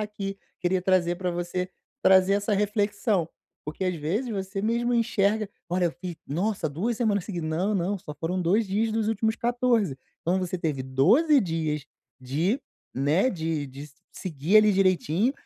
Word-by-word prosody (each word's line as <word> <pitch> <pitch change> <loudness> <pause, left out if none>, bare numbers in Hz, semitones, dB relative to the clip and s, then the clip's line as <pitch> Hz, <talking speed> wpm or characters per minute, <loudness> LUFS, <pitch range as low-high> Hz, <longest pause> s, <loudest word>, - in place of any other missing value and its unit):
aqui, 200 -2 -4 0.2
queria 185 +1 +1
trazer 180 -1 +2
pra 180 -1 -2
você, 175 +1 -3 0.3
trazer 190 +1 +5
essa 205 +1 0
reflexão, 205 -3 0 0.4
porque 155 +5 -4
às 185 -1 0
vezes 190 - -2
você 195 -1 -3
mesmo 235 +2 +1
enxerga: 215 -2 +1 0.2
"Olha, 180 0 +1
eu - - 0
fiz 175 -2 -5
nossa, 180 +2 -1
2 200 +11 -2
semanas 210 -5 +1
seguidas. 175 -6 -4
Não, 185 +7 0
não, 195 +2 0
só 150 -4 -9
foram 170 +5 -2
2 200 +6 +2
dias 215 +3 0
dos 220 -1 0
últimos 220 0 +1
14", 240 - +1 0.3
então 180 +3 +1
você 185 -1 -2
teve 155 -6 -2
12 220 - +4
dias 160 - -2 0.4
de, 160 - 0 0.3
né, 150 - +2
de 160 - -2
de 135 +1 -10
s 145 -1 -12 0.2
seguir, 170 +3 +2
ali, 215 -1 +5
direitinho 185 - +2
190 Hz, 165 wpm, -26 LUFS, 165-215 Hz, 0.4 s, trazer